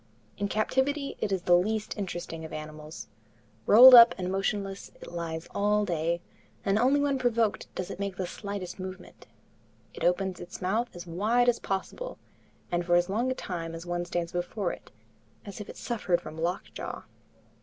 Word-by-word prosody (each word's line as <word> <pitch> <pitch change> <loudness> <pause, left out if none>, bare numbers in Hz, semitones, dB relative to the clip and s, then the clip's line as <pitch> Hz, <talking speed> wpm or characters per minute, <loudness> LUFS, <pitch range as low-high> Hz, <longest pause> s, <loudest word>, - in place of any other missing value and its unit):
In 200 - 0
captivity 265 +7 0
it 210 - -1
is 190 -2 -1
the 175 - +5
least 215 +4 0
interesting 175 -5 -5
of 160 - -8
animals. 155 0 -8 0.6
Rolled 255 +4 +10
up 235 -1 +10
and 180 0 -3
motionless, 195 0 -2
it - - -10
lies 165 -1 -4
all 210 +1 +2
day, 170 -1 -1 0.4
and 195 +2 +2
only 265 +4 +4
when 280 -2 +1
provoked 235 -4 +1
does 185 +1 -4
it - - -7
make 200 -1 -3
the 185 - -2
slightest 200 0 -6
movement. 185 0 -9 0.7
It - - -7
opens 180 +1 +1
its 175 +1 -8
mouth 215 +6 0
as 175 - -8
wide 215 +8 +1
as 240 -1 +3
possible, 195 - -4 0.5
and 175 0 +1
for 175 0 +2
as 175 +1 +3
long 230 +6 0
a 260 - -1
time 165 -6 -5
as 165 +1 -8
one 175 0 -2
stands 175 -1 -3
before 175 +2 -2
it, - - -10 0.6
as 205 +1 -7
if 210 - -9
it - - -9
suffered 200 -7 0
from 155 -3 -9
lockjaw. 170 +4 -4
190 Hz, 175 wpm, -28 LUFS, 175-215 Hz, 0.7 s, Rolled